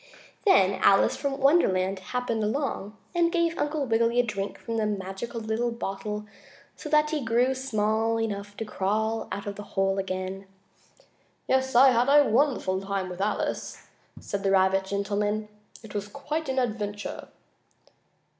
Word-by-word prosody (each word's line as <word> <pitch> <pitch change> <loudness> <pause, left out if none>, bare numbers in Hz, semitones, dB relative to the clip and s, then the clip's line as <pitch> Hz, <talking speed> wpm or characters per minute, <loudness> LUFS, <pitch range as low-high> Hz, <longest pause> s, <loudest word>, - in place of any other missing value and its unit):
Then 200 - +4
Alice 195 - +5
from 280 -1 -2
Wonderland 195 - +3
happened 230 +2 -2
along 215 -3 -2 0.2
and 340 -1 +2
gave 335 -1 0
Uncle 295 -1 -1
Wiggily 230 0 +2
a - - +5
drink 205 -4 -4
from 230 -1 -3
a 215 - +1
magical 200 +3 -4
little 225 +2 -1
bottle 210 -2 -4 0.5
so 300 - -8
that 300 0 +3
he 300 -3 -1
grew 240 +3 +2
small 225 -3 0
enough 205 -2 -4
to 225 - -3
crawl 215 +2 -1
out 200 - -4
of 200 -1 -5
the - - -6 0.2
hole 195 0 +2
again. 190 0 -4 1.0
"Yes, 265 -1 +1
I 265 +2 +8
had 245 +2 +2
a 290 0 +6
wonderful 225 -6 +1
time 195 -1 -3
with 180 +1 -6
Alice," 210 +1 -2 0.3
said 200 - -4
the 195 - +1
rabbit 190 0 +3
gentleman. 205 +2 -1 0.3
"It 220 - -11
was 205 -1 -3
quite 295 +6 -4
an 265 - -2
adventure." 210 -4 -3
220 Hz, 155 wpm, -27 LUFS, 200-260 Hz, 1.0 s, I